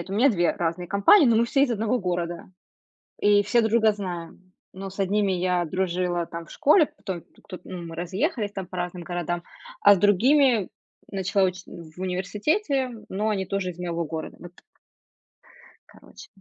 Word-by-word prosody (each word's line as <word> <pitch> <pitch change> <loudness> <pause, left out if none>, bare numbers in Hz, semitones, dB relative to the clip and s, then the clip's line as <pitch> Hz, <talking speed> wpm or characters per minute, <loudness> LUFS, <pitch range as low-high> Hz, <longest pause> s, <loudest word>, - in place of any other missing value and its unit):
это 185 +3 -7
у - - -1
меня 255 +5 +5
2 175 -5 +2
разные 170 +1 -3
компании, 200 - +6
но 230 -2 +4
мы 230 - +4
все 275 +3 +2
из 270 - +2
одного 225 +2 0
города 175 -2 -3 0.7
и 205 0 +4
все 220 +4 +2
друг 220 -1 0
друга 220 -2 +4
знаем. 185 -2 -7 0.2
Но 195 +1 -7
с 195 - -14
одними 200 0 +1
я 180 -1 0
дружила 175 0 -1
там 165 0 -8
в - - -18
школе, 305 +2 +4
потом 180 -4 -6
тук - - -27
ту 185 - -7
ну, 180 -2 -7
мы 165 - -8
разъехались 205 - -2
там 195 -2 -5
по 185 - -9
разным 175 0 -4
городам. 175 0 -3 0.4
А 205 - +7
с - - -2
другими 235 +3 +4 0.4
начала 195 0 +1
учить 185 0 -5
в 165 0 -12
университете, 250 - -1 0.2
но 210 +3 -2
они 190 -3 -1
тоже 195 -1 -2
из 170 - -12
моего 170 -1 -3
города, 160 +1 -6
вот 175 0 -11
так. - - -23 1.3
Короче. - - -15
190 Hz, 185 wpm, -25 LUFS, 175-210 Hz, 1.3 s, А